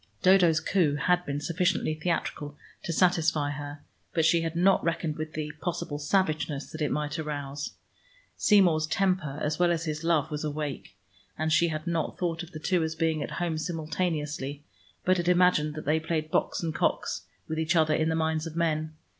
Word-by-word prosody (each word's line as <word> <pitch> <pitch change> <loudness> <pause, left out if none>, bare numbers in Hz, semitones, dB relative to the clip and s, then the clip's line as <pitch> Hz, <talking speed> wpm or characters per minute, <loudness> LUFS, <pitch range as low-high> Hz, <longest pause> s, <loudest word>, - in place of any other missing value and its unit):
Dodo's 180 -4 +5
coup 160 -3 +2
had 180 +4 +2
been 140 0 -2
sufficiently 170 +1 0
theatrical 155 -2 -3 0.3
to - - -2
satisfy 165 -4 +2
her, 145 0 -7 0.3
but 160 -2 +3
she 165 +1 +4
had 165 0 -3
not 190 +3 +4
reckoned 165 -2 -1
with 155 0 -5
the 150 -1 -3
possible 170 -4 -3
savageness 155 -3 0
that 155 - -7
it 150 - +1
might 150 0 -2
arouse. 145 -2 -4 0.6
Seymour's 175 -7 +4
temper, 180 -5 0
as 150 +2 -1
well 175 -1 +4
as 170 0 -1
his 155 0 -3
love, 160 -2 +1
was 150 0 -3
awake, 150 -2 -4 0.4
and 155 +1 0
she 170 - +4
had 155 -1 -4
not 170 -2 -1
thought 170 -2 -1
of 170 - -8
the - - -7
two 180 +3 +1
as 160 0 -2
being 160 -1 0
at - - -3
home 170 -3 -1
simultaneously, 155 -4 -3 0.4
but 185 0 +4
had 175 -1 -2
imagined 175 -4 +3
they 155 +1 0
played 160 -1 -2
Box - - 0
and 160 -1 -1
Cox - - -1 0.2
with 160 0 -3
each 160 +2 +1
other 155 -2 +4
in 155 +1 +1
the 160 - +1
minds 160 0 0
of 160 - -8
men. 155 -2 0
160 Hz, 190 wpm, -28 LUFS, 150-170 Hz, 0.6 s, Dodo's